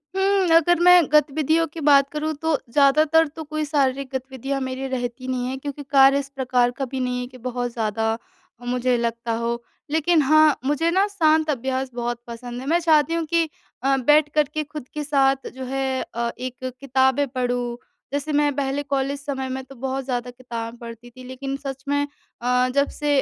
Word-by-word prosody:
हम्म, 385 -1 +2
अगर 340 +1 +4
मैं 360 0 +8
गतिविधियों 305 +2 +3
की 325 - -6
बात 275 -1 +6
करूँ 305 +1 -2
तो 320 -1 +2
ज़्यादातर 305 +4 +4
तो 315 +2 -8
कोई 310 +1 -3
शारीरिक 275 -2 0
गतिविधियाँ 265 +1 -3
मेरी 260 +1 -3
रहती 250 0 -4
नहीं 255 -1 -1
हैं, 260 +1 -3
क्योंकि 285 +1 -6
कार्य 275 0 +6
इस 275 -1 -6
प्रकार 250 -2 +2
का 270 - 0
भी 260 +1 -5
नहीं 250 -1 -1
हैं 250 - -4
कि 255 - -13
बहुत 245 -1 -2
ज़्यादा 225 0 -1 0.5
मुझे 250 0 +1
लगता 235 0 -2
हो। 235 +1 -2 0.3
लेकिन 320 +1 +3
हाँ, 310 +1 +5
मुझे 295 +4 +1
ना 385 +3 +3
शांत 315 -6 +2
अभ्यास 260 -1 -2
बहुत 240 0 -3
पसंद 240 +1 -7
हैं, 265 - -7
मैं 335 +2 +3
चाहती 320 -1 +3
हूँ 335 -1 -1
कि 330 0 +1 0.3
अ, 270 0 +3
बैठ 295 +3 +4
कर 300 - +5
के 310 -1 -1
खुद 295 -3 -9
के 300 - -3
साथ 275 -2 +2
जो 260 - -6
है 265 0 -1
अ, 235 0 -1
एक 255 0 -5
किताबें 265 +1 +2
पढूँ, 245 -1 -2 0.4
जैसे 290 +2 -2
मैं 290 0 +3
पहले 280 0 -1
कॉलेज 275 0 -1
समय 270 -2 -4
में 265 +1 -4
तो 270 +1 -14
बहुत 265 +2 -3
ज़्यादा 245 -1 -3
किताबें 235 -2 -7
पढ़ती 235 0 -10
थी। 255 +1 -13
लेकिन 270 +1 -5
सच 270 -1 -7
में 285 0 +1 0.4
अ, 250 +1 +2
जब 280 0 +3
से 290 -2 +2
270 Hz, 195 wpm, -23 LUFS, 250-300 Hz, 0.5 s, मैं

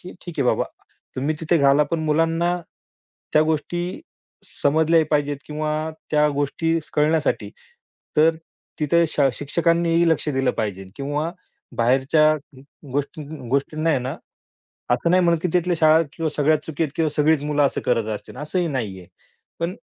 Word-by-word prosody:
की 180 - -10
ठीक 175 -3 -9
आहे 130 - +2
बाबा - - +2 0.5
तुम्ही 140 +4 0
तिथे 165 +1 +2
घाला, 140 +1 +5
पण 160 +3 -2
मुलांना 165 +3 +1 0.8
त्या 155 - +5
गोष्टी 175 +3 -2 0.4
समजल्याही 160 +2 +2
पाहिजेत 145 -1 +1
किंवा 155 0 -3 0.4
त्या 150 0 +4
गोष्टी 165 +4 0
स - - -10
कळण्यासाठी, 155 +1 +1 0.7
तर 160 +2 +5 0.5
तिथे 170 +3 +3
शा 140 -3 +2
शिक्षकांनीही 170 +3 +1
लक्ष 155 -1 +1
दिलं 135 -2 +1
पाहिजेल 95 -4 -4
किंवा 145 +3 -2 0.5
बाहेरच्या 135 +6 +3
अं, 145 -3 -8 0.3
गोष्टी 145 +2 -3 0.3
गोष्टींना 155 +4 0
आहे 145 - +2
ना, 125 +1 -4 0.8
असं 125 +8 +2
नाही 185 +1 +4
म्हणत, 170 -1 +3
की 180 - +1
तिथल्या 180 0 +2
शाळा 160 0 +6
किंवा 160 +3 -2
सगळ्या 155 +1 +2
चुकीत 160 0 -2
किंवा 160 -1 +2
सगळीच 150 0 +2
मुलं 150 0 +1
असं - - -2
करत 115 -3 +1
असतील 105 - -10
असंही 170 +4 -1
नाहीये. 100 - -4 0.5
पण 170 +2 -1
155 Hz, 150 wpm, -22 LUFS, 140-165 Hz, 0.8 s, शाळा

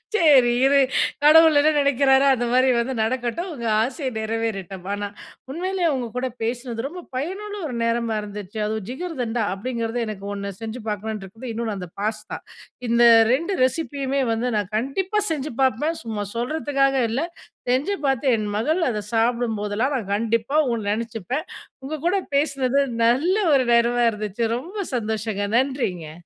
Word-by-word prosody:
சரி 280 - +6
இரு, 280 +1 +5 0.4
கடவுள் 315 0 +7
என்ன 310 +2 +4
நெனைக்கிறாரோ, 275 -1 +4
அந்த 240 0 -2
மாரி 255 +1 +4
வந்து 255 +3 -1
நடக்கட்டும். 250 +9 -2
உங்க 235 -4 -6 0.2
ஆசையை 260 +2 -3
நிறைவேறட்டும். 215 -5 -3
ஆனா, 205 0 -3 0.4
உண்மையிலேயே 360 +1 0
உங்க 245 -2 -3
கூட 260 +1 0 0.2
பேசினது 240 0 -3
ரொம்ப 355 +4 -8
பயனுள்ள 390 +9 -4
ஒரு 250 - -5
நேரமா 230 -1 0
இருந்துச்சு. 205 0 -8
அதுவும் 215 -2 -3
"ஜிகர்தண்டா" 250 -6 -3
அப்படிங்கிறது 230 +2 -3
எனக்கு 200 -2 -6
1 200 0 -4
செஞ்சு 225 +2 -5
பாக்கணுன்ட்ருக்கு. 215 +2 -5
இன்னொண்ணு 225 -2 -3
அந்த 180 -2 -7
பாஸ்தா. 215 0 -3 0.5
இந்த 235 +1 +4 0.3
2 335 +8 0
ரெசிபியுமே 275 -1 -1
வந்து, 235 +3 -1
நான் 205 -1 -2
கண்டிப்பா 370 - -1
செஞ்சு 300 -2 -2
பாப்பேன். 270 +6 +1
சும்மா 215 -3 -3
சொல்றதுக்காக 275 0 +1
இல்லை. 270 +9 -1 0.4
செஞ்சு 280 +11 +1
பாத்து 270 0 0
என் 215 -1 -2
மகள் 310 +11 +1
அதை 210 -3 -3
சாப்பிடும் 230 -1 +1
போதெல்லாம், 210 +7 -1
நான் 200 -4 -5
கண்டிப்பா 230 +5 -1 0.2
ஒண்ணு 220 -3 -2
நெனைச்சிப்பேன். 230 - -3 0.4
உங்க 300 +4 -4
கூட 380 - +2 0.2
பேசுனது 275 -2 +1 0.3
நல்ல 290 - +3 0.2
ஒரு 260 -2 +4
நேரமா 240 +1 +3
இருந்துச்சு. 210 +1 -4
ரொம்ப 355 +11 -8 0.2
சந்தோஷங்க. 215 -2 -2
நன்றிங்க. 245 - -1
245 Hz, 145 wpm, -23 LUFS, 220-280 Hz, 0.5 s, கடவுள்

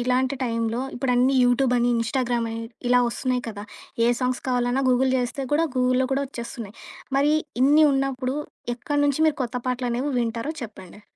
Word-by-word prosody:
ఇలాంటి 255 +2 +1
టైంలో 230 0 -1
ఇప్పుడన్నీ 250 +1 +2
యూట్యూబని 245 -1 +2
ఇన్‌స్టాగ్రామని 230 -1 -1 0.3
ఇలా 250 0 +5
వస్తున్నాయి 250 +1 -1
కదా! 205 -2 -6 0.4
ఏ - - +4
సాంగ్స్ 250 0 -1
కావాలన్నా 245 +1 +1
గూగుల్ 255 +1 +3
చేస్తే 250 +2 -2
కూడా 315 +3 +3
గూగుల్‌లో 255 +1 +2
కూడా 280 +1 0
వచ్చేస్తున్నాయి. 235 -4 -7 0.4
మరి 285 +2 +3 0.3
ఇన్ని 295 +3 +6
ఉన్నప్పుడు 270 0 -1 0.4
ఎక్కడి 290 +4 -2
నుంచి 285 +1 0
మీరు 310 - +1
కొత్త 250 0 -3
పాటలు 250 0 -1
అనేవి 260 +5 -1
వింటారో 230 +5 -2
చెప్పండి. 205 -2 -10
250 Hz, 150 wpm, -24 LUFS, 235-265 Hz, 0.4 s, ఇన్ని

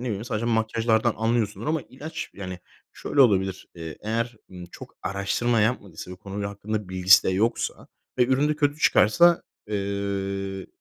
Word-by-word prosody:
bileyim, 110 -3 -3
sadece 110 -1 -2
makyajlardan 115 0 +1
anlıyorsundur 110 -1 0
ama 155 0 +1
ilaç 155 +5 -7
Yani, 95 -2 -6 0.3
şöyle 145 - -1
olabilir, 95 -5 +1
eee, 80 -2 -8
eğer, 115 +2 -2
ımm, 90 -1 -9
çok 85 - -12
araştırma 100 +5 0
yapmadıysa 100 -6 -2
ve 90 - -8
konuyla 100 +1 -5
hakkında 105 0 -4
bilgisi 95 +1 +6
de - - +2
yoksa 105 +5 -1 0.3
ve 125 - +5
ürün 135 +3 +2
de 150 - 0
kötü 145 0 +1
çıkarsa, 170 +7 +5 0.3
eee, 100 -1 -3
105 Hz, 150 wpm, -25 LUFS, 95-120 Hz, 0.3 s, bilgisi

